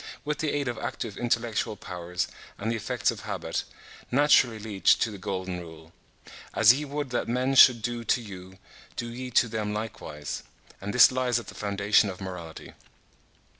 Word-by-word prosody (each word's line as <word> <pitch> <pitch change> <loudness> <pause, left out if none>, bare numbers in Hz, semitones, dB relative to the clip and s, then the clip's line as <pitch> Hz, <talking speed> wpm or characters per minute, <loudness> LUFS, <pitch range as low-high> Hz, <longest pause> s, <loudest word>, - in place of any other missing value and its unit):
—with 150 0 -2
the 155 - 0
aid 145 -1 -1
of 120 -2 -3
active 110 -4 -4
intellectual 115 -2 -1
powers 90 -1 -4 0.3
and 110 +3 -2
the - - 0
effects 110 - 0
of - - -8
habit, - - -3 0.5
naturally 130 -4 +4
lead 105 -2 -8
to 115 - +4
the 100 - -8
golden 95 -1 -4
rule, 80 -1 -13 0.6
"As 115 +1 +7
ye 145 +3 -3
would 145 -2 -4
that 120 - -1
men 125 +3 0
should 125 -3 +7
do 120 0 -2
to 120 - +2
you, 95 -4 -10 0.4
do 120 - -4
ye 125 +2 -6
to 125 0 +3
them 105 -2 -3
likewise;" 75 -9 -5 0.4
and 100 +1 -3
this 125 +3 +7
lies 125 -2 +1
at 120 - -10
the - - -9
foundation 100 0 +2
of 90 - -7
morality. 90 -4 -8
110 Hz, 175 wpm, -27 LUFS, 95-125 Hz, 0.6 s, As